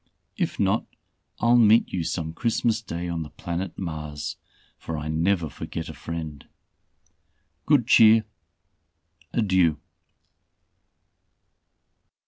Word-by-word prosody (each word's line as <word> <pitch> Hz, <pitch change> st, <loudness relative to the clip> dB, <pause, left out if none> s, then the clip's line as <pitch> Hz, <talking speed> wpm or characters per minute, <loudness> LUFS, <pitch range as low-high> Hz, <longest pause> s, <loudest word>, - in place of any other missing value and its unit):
If -, -, -2 dB
not, -, -, +1 dB, 0.5 s
I'll 120 Hz, +1 st, +4 dB
meet 110 Hz, 0 st, +5 dB
you 90 Hz, -3 st, -1 dB
some 80 Hz, -1 st, -3 dB
Christmas 115 Hz, +2 st, 0 dB
day 85 Hz, -5 st, -5 dB
on 85 Hz, -1 st, -3 dB
the 75 Hz, -, -6 dB
planet 85 Hz, +4 st, -5 dB
Mars, 75 Hz, -4 st, -5 dB, 0.4 s
for 80 Hz, -, -5 dB
I 75 Hz, +1 st, -4 dB
never 85 Hz, +2 st, +1 dB
forget 80 Hz, +2 st, -6 dB
a -, -, -7 dB
friend. 75 Hz, 0 st, -6 dB, 1.2 s
Good 140 Hz, -6 st, +4 dB
cheer! 110 Hz, -1 st, +6 dB, 1.1 s
Adieu." 95 Hz, -8 st, +2 dB
85 Hz, 105 wpm, -25 LUFS, 80-110 Hz, 1.2 s, cheer